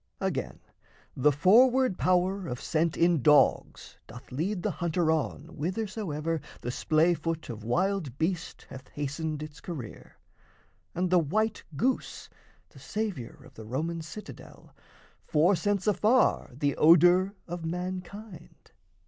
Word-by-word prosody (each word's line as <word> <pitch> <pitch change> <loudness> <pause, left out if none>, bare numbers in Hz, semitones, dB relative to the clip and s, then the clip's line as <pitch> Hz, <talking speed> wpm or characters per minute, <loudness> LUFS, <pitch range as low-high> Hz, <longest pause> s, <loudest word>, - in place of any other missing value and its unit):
Again, - - -3 0.6
the 150 +3 +4
forward 240 - +4
power 185 +1 +1
Of 125 -1 -4
scent 165 0 0
in 170 -3 +3
dogs 150 +2 +2
doth 125 +4 -12
lead 175 +8 -2
the - - 0
hunter 170 -1 0
on 160 -2 -2
Whithersoever 165 -3 -3 0.2
the 120 - -3
splay 160 +6 +2
foot 165 0 -4
of 110 -2 -9
wild 170 - -1
beast 165 +1 -3
Hath 130 0 -10
hastened 150 +1 -4
its 150 -1 -10
career; 145 -11 -8 0.8
and 180 +1 -1
the 180 - +6
white 215 +8 0 0.2
goose, 260 - -2 0.4
The - - -16
saviour 205 - -5
of - - -16
the 110 - -10
Roman 165 +7 -3
citadel, 170 +7 -11 0.5
Forescents 185 +4 +1
afar 215 +4 +2
the 140 +1 0
odour 175 +5 +5
of 175 -1 -6
mankind. 180 +3 -7
170 Hz, 125 wpm, -28 LUFS, 150-190 Hz, 0.8 s, the